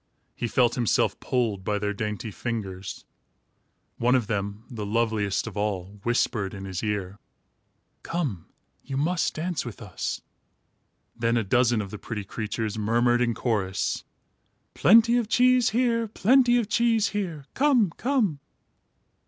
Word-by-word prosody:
He 120 - -3
felt 120 +2 +3
himself 120 -3 +1
pulled 115 -7 -1
by 105 +2 0
their 105 0 -1
dainty 105 +1 -4
fingers. 100 -4 -5 0.9
One 125 +2 +3
of 125 -4 +2
them, 100 0 -3
the 115 -5 -6
loveliest 105 -2 0
of 115 -4 -7
all, 100 -1 -3
whispered 110 -3 0
in 95 0 -7
his 95 -2 -4
ear: 100 -3 -3 0.8
"Come, 140 - -3 0.4
you 135 - -4
must 165 +5 0
dance 170 +1 -2
with 120 -4 -8
us." 100 -6 -4 1.0
Then 115 0 +1
a 115 - +1
dozen 120 +1 +2
of 100 - -9
the 105 - -7
pretty 105 -3 -5
creatures 110 +1 -4
murmured 120 +3 +2
in 120 -2 +1
chorus: 100 -6 -1 0.7
"Plenty 230 +4 +6
of 230 -3 -1
cheese 250 0 +4
here. 230 0 +1
Plenty 245 +3 +4
of 235 -4 0
cheese 225 -1 +2
here. 175 -9 -4
Come, 255 - +3
come!" 235 - 0
115 Hz, 140 wpm, -26 LUFS, -, 1.0 s, Plenty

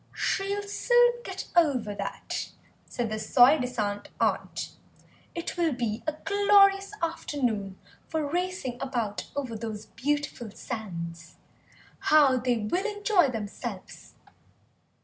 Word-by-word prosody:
"She'll 400 +1 0
soon 485 +4 +4
get 380 -3 -6
over 265 -11 +3
that," - - -5 0.3
said 235 -3 -3
the 215 - -2
soi 250 +7 +6
disant 215 -5 -2
aunt; - - -1 0.6
"it 340 +1 -4
will 335 -4 +2
be 235 -2 -2
a 310 - +1
glorious 395 -1 +5
afternoon 245 - -1 0.3
for 315 -2 -1
racing 350 -6 -2
about 235 -6 -2
over 260 -5 -3
those 215 -1 -5
beautiful 290 -4 -2
sands. 170 -8 -6 0.6
How 290 -4 +5
they 245 -1 +1
will 290 - -1
enjoy 410 -6 +3
themselves!" 215 -4 -6
260 Hz, 110 wpm, -28 LUFS, 220-355 Hz, 0.6 s, soi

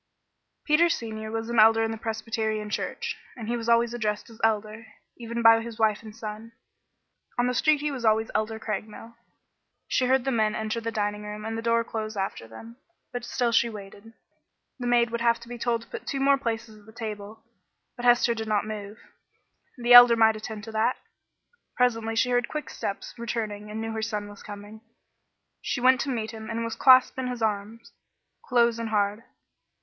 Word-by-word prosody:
Peter 325 +3 +4
Senior 220 -7 -4
was 225 0 -3
an 235 -1 +1
Elder 225 +1 +6
in 225 - -1
the - - -3
Presbyterian 220 -1 -3
Church, - - -3 0.2
and 225 -3 -7
he 240 - -1
was 235 -1 -4
always 235 0 +3
addressed 215 -2 -3
as 225 - -15
Elder, 220 0 0 0.3
even 235 0 -4
by 225 0 +7
his 230 -1 -8
wife 220 -2 +2
and 215 -2 -11
son. 225 0 -8 0.8
On 245 - +2
the 250 - 0
street 300 +3 +2
he 300 0 -1
was 260 -4 -6
always 220 0 +2
Elder 220 +1 -1
Craigmile. 220 +2 -6 0.7
She 255 - +1
heard 260 0 +2
the 270 - +1
men 215 -3 +1
enter 220 +1 -3
the 230 - -3
dining 210 -1 -2
room 210 0 -7
and 225 0 -3
the 225 - -3
door 230 0 +2
close 220 -2 -5
after 195 -12 -3
them, 225 - -12 0.4
but 245 0 -4
still 240 0 -1
she 235 +1 +3
waited. 205 +1 -11 0.7
The 245 - -3
maid 240 -1 +3
would 235 0 -3
have 235 0 +3
to 235 - -12
be 240 0 -8
told 235 -1 0
to - - -19
put - - -8
two 275 - -2
more 275 +1 +4
places 225 -3 -4
at 205 - -22
the - - -13
table, 215 0 -7 0.5
but 245 - -8
Hester 240 -1 +4
did 225 -1 -5
not 210 -1 +1
move. 210 -1 -7 0.8
The 240 0 +3
Elder 245 -1 +10
might 220 -1 +4
attend 215 -1 -7
to 225 - -8
that. 220 +3 +1 0.8
Presently 225 -2 +1
she 250 +2 +2
heard 245 -1 +1
quick 305 -1 -5
steps 200 - -5
returning 215 -3 -4
and 215 +1 -5
knew 225 0 -3
her 220 0 -3
son 210 -2 -3
was 205 - -13
coming. 205 +1 -10 0.8
She - - -2
went 255 0 +4
to 275 - -3
meet 225 -4 -2
him 220 -1 -9
and 230 0 -2
was 230 -1 -4
clasped 260 0 +6
in 255 - -2
his 245 -2 -4
arms, 215 +2 -3 0.5
close 235 -2 +2
and 230 -1 -3
hard. 210 +1 0
225 Hz, 200 wpm, -26 LUFS, 215-235 Hz, 0.8 s, Elder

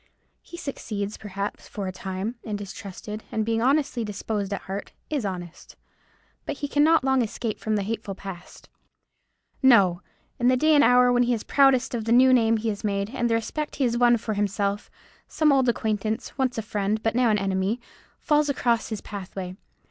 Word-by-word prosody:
He 345 - -11
succeeds, 215 -9 -4
perhaps, 200 0 -5
for 200 - -5
a - - -2
time, 190 +4 -4
and 210 -2 -4
is 205 0 -7
trusted, 210 +1 -8
and 220 -1 -1
being 225 0 0
honestly 270 -1 +1
disposed 205 -1 -3
at 200 - -2
heart, 195 +1 -6 0.2
is 280 -8 -1
honest: 175 -3 -7 0.7
but - - -3
he 285 - -3
cannot 300 +1 +4
long 265 -1 +3
escape 225 -1 -3
from 215 0 -1
the 205 - 0
hateful 210 -1 -4
past. 195 -3 -10 0.9
No! 200 -9 +5 0.4
In 245 - +2
the 255 0 +4
day 310 +4 +4
and 290 -1 +6
hour 250 -1 +5
when 245 - +3
he 245 0 +2
is 215 - -6
proudest 270 -3 +3
of 225 -2 -2
the 225 - -1
new 255 +2 +6
name 230 -2 +4
he 225 +1 -2
has 205 -1 -4
made, 200 0 -1
and 240 -3 -1
the 230 - +2
respect 295 +7 -3
he 280 - 0
has 240 -2 +1
won 240 0 +5
for 220 -1 -3
himself, 200 0 -1 0.4
some 310 -2 +2
old 265 -3 +3
acquaintance, 220 0 -2
once 260 -3 0
a 225 - -2
friend, 210 0 -1
but 225 - +1
now 245 0 +3
an 210 - +3
enemy, 195 +3 -1 0.4
falls 300 -2 +2
across 240 -4 +1
his 220 -3 -4
pathway. 190 -2 -7
225 Hz, 195 wpm, -25 LUFS, 200-250 Hz, 0.9 s, and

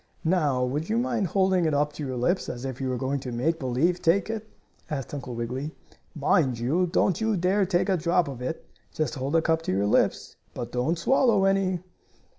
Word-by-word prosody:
"Now, 150 -7 +2
would 150 +7 -3
you 225 - +1
mind 235 -5 0
holding 190 0 +2
it 155 -2 +1
up 145 +1 +1
to 150 - -6
your 130 -2 -3
lips, 175 +10 0
as 125 +1 -5
if 130 -1 -5
you 130 - -1
were 125 - -1
going 135 +3 -1
to 130 -2 -6
make 160 +8 0
believe 140 +7 +1
take 195 +6 +2
it?" 220 -1 -5 0.4
asked 140 -3 -4
Uncle 125 -4 -5
Wiggily. 130 +6 -4 0.4
"Mind 140 -3 +2
you, 150 +11 +1
don't 185 +3 +1
you 220 -2 +1
dare 185 +3 +2
take 175 +1 +1
a 190 -2 +2
drop 170 +1 +2
of 130 -3 -7
it. 130 +6 -4 0.3
Just 155 - -2
hold 135 0 -3
the 165 -1 +3
cup 160 -1 +2
to - - -3
your 100 +2 +1
lips, 105 - +1 0.2
but 120 - -5
don't 125 +8 0
swallow 230 -1 +3
any." 195 -2 +1
160 Hz, 215 wpm, -26 LUFS, 130-185 Hz, 0.4 s, the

